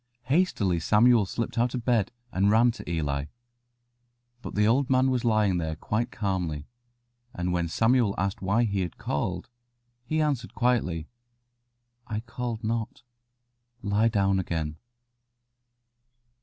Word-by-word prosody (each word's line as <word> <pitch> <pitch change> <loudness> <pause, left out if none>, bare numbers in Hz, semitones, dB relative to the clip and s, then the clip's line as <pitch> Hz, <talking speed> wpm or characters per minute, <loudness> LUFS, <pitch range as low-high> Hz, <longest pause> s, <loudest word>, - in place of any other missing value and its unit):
Hastily 120 - +1
Samuel 110 +4 +4
slipped 115 +2 -3
out 120 +2 +1
of 120 -3 -4
bed, 115 -6 +2 0.2
and 95 +2 +2
ran 115 +3 +5
to 115 - -9
Eli. 70 -4 -1 1.2
But - - -7
the 105 +1 +3
old 130 +5 +2
man 130 0 +3
was 125 -2 0
lying 105 -6 +2
there 80 -1 -2
quite 110 +8 -2
calmly, 90 -7 -2 0.7
and 90 0 -1
when 85 -1 0
Samuel 115 +3 +2
asked 100 +1 -2
why 100 +5 +2
he 100 -4 0
had 90 -3 -4
called, 90 +5 -2 0.6
he 155 +6 -1
answered 140 -6 -1
quietly, 110 -11 0 1.0
"I 110 -1 -3
called 115 -1 -5
not; 115 +1 -3 0.8
lie 105 +2 +2
down 100 -3 +2
again." 80 -4 -3
105 Hz, 130 wpm, -27 LUFS, 90-120 Hz, 1.2 s, ran